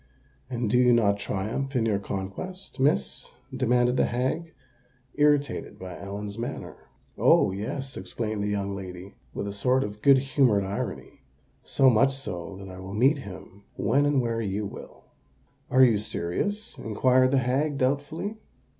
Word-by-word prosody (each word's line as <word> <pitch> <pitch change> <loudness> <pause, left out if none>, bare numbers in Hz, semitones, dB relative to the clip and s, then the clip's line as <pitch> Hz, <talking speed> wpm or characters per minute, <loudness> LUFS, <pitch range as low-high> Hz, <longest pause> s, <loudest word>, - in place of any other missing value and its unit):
"And 120 -2 -2
do 125 +4 +3
you 125 -1 +5
not 100 -3 +3
triumph 110 +8 -3
in 115 -3 +2
your 105 -3 +1
conquest, 100 - -6
Miss?" 130 - +1 0.3
demanded 125 0 +2
the - - +3
hag, 130 +8 -2 0.6
irritated 145 -1 +1
by 90 -1 -8
Ellen's 100 +2 -6
manner. 120 - -6 0.3
"Oh! - - +5
yes," 130 +7 -4
exclaimed 105 +3 -3
the 100 - -1
young 100 -1 -2
lady, 95 0 -8 0.2
with - - -3
a 100 - -4
sort 125 +6 +2
of 105 0 -7
good 140 -1 +7
humoured 130 -6 +2
irony; 95 +1 -5 0.4
"so 135 - +3
much 135 +4 +3
so, 95 -8 -6
that 95 0 -9
I 95 0 -9
will 95 +2 -7
meet 135 +7 +4
him 100 -2 -10
when 145 +2 +2
and 145 -2 +3
where 115 -1 -1
you 105 0 -2
will." 100 - -10 0.7
"Are 130 +1 +6
you 115 -5 +5
serious?" 200 - -2
inquired 130 +4 +3
the 135 - +2
hag, 135 +4 +1
doubtfully. 145 +10 -1
120 Hz, 155 wpm, -26 LUFS, 100-135 Hz, 0.7 s, good